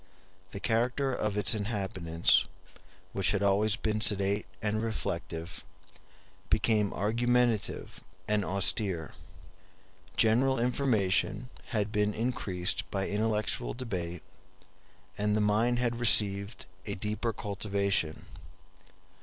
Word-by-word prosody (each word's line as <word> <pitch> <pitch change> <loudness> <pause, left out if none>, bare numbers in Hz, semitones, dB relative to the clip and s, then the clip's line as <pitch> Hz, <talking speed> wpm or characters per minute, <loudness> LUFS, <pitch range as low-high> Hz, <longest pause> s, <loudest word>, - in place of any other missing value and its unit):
The 100 - -7
character 125 +6 +1
of 105 -4 -1
its 105 +2 +4
inhabitants, 95 -6 +1 0.7
which 95 0 +2
had 100 0 0
always 100 +2 +3
been 110 -1 -1
sedate 100 -1 +2
and 110 +1 -1
reflective, 85 -6 -4 0.9
became 105 -3 +2
argumentative 120 +1 0 0.2
and 105 -1 +1
austere. 95 -3 0 1.0
General 125 +4 +3
information 120 -2 +1 0.2
had 105 -4 -1
been 105 -1 +1
increased 105 -6 -1
by 95 -1 -2
intellectual 105 - -1
debate, 90 -9 -4 1.0
and 105 0 +1
the - - +2
mind 110 +4 +2
had 120 -1 -1
received 100 -2 +3 0.2
a 100 - -2
deeper 105 +4 -2
cultivation. 100 -5 -1
105 Hz, 100 wpm, -30 LUFS, 100-115 Hz, 1.0 s, its